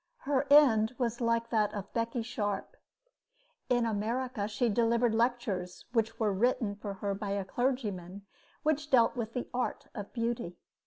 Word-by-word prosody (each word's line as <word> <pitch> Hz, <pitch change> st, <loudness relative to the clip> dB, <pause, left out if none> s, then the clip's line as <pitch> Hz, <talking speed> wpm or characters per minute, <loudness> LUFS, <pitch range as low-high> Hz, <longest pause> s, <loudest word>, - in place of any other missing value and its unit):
Her 280 Hz, 0 st, 0 dB
end 255 Hz, -6 st, +6 dB
was 240 Hz, -1 st, -1 dB
like 230 Hz, 0 st, +1 dB
that 215 Hz, -3 st, +2 dB
of 200 Hz, -1 st, -6 dB
Becky 230 Hz, 0 st, -1 dB
Sharp. 215 Hz, -, -3 dB, 0.9 s
In 245 Hz, -2 st, +3 dB
America 225 Hz, +1 st, -1 dB
she 215 Hz, +3 st, 0 dB
delivered 235 Hz, +1 st, +2 dB
lectures 225 Hz, -6 st, -1 dB
which 225 Hz, -1 st, 0 dB
were 215 Hz, -3 st, +2 dB
written 220 Hz, 0 st, +1 dB
for 205 Hz, -1 st, -6 dB
her 200 Hz, +1 st, -2 dB
by 200 Hz, 0 st, -3 dB
a 200 Hz, -1 st, -2 dB
clergyman 215 Hz, -6 st, -1 dB
and 200 Hz, +2 st, -9 dB, 0.4 s
which 300 Hz, -1 st, 0 dB
dealt 240 Hz, -4 st, +4 dB
with 230 Hz, -2 st, -4 dB
the 250 Hz, -, -2 dB
art 250 Hz, 0 st, -2 dB
of 205 Hz, -4 st, -7 dB
beauty. 230 Hz, -7 st, -2 dB
230 Hz, 160 wpm, -31 LUFS, 205-245 Hz, 0.9 s, end